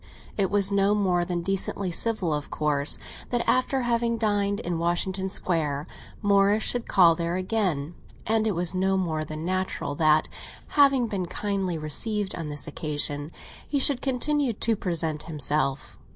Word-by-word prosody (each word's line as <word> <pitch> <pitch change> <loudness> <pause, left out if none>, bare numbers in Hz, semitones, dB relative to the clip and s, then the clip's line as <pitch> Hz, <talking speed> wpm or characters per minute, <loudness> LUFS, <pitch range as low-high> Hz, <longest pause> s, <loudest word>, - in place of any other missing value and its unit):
It 195 -3 +1
was 200 -1 +3
no 200 +1 +2
more 185 -4 +1
than 175 -1 -3
decently 195 0 -1
civil, 190 -3 +2
of 150 -1 -4
course, 150 -1 +1 0.3
that 240 -1 -1
after 255 +1 +1
having 235 -1 0
dined 205 -2 0
in 175 -4 -3
Washington 185 +3 -1
Square, 155 -6 -1 0.4
Morris 200 +1 +3
should 245 -1 +1
call 175 -4 +5
there 170 +1 -3
again; 185 -6 -1 0.3
and 220 0 +1
it 210 - 0
was 175 +1 0
no 190 +1 +1
more 160 -4 -1
than 155 +1 -6
natural 185 -5 -2
that, 155 +1 +3 0.4
having 275 -4 +4
been 195 -5 -3
kindly 195 -2 -2
received 200 +7 +1
on 165 -3 -5
this 145 -1 -2
occasion, 145 -1 -1 0.4
he 290 - -1
should 275 -1 +4
continue 275 0 0
to 225 +2 0
present 165 -5 -2
himself. 145 -3 -1
185 Hz, 155 wpm, -25 LUFS, 160-215 Hz, 0.4 s, call